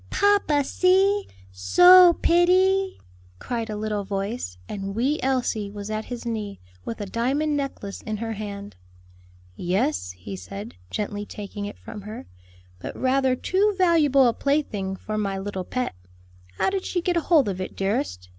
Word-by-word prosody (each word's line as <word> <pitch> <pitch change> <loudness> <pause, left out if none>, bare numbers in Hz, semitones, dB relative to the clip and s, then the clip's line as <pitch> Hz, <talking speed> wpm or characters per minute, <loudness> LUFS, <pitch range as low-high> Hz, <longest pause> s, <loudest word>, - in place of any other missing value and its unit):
"Papa, 405 -8 +3
see! 385 +6 +2 0.2
so 355 - +7
pitty!" 375 +3 +3 0.4
cried 230 - -4
a 215 - -3
little 210 -1 -2
voice; 195 - -4
and 195 -1 -5
"wee 270 +7 +1
Elsie" 250 -6 0
was 205 +1 -7
at 215 0 -3
his 245 -1 -7
knee, 215 -4 -4 0.2
with 225 - -6
a 205 - -3
diamond 270 +9 0
necklace 275 -8 -4
in 215 -1 -4
her 225 +1 -3
hand. 205 -1 -7 0.8
"Yes," 100 - -1
he 90 +2 -8
said, 100 +4 -8 0.2
gently 205 0 -3
taking 205 0 -7
it 205 - -7
from 220 -2 -9
her, 215 +3 -8 0.5
"but - - -7
rather 260 0 +2
too 395 +9 +1
valuable 305 -8 +4
a 235 - +2
plaything 220 -11 -1
for 215 +2 -4
my 195 -2 -1
little 190 -1 -4
pet. 255 +5 -2 0.6
How - - +1
did 385 -1 -2
she 355 -2 -2
get 355 0 0
hold 320 -5 +3
of 190 -2 -3
it, 185 - -6
dearest?" 90 - -2
225 Hz, 155 wpm, -24 LUFS, 200-300 Hz, 0.8 s, so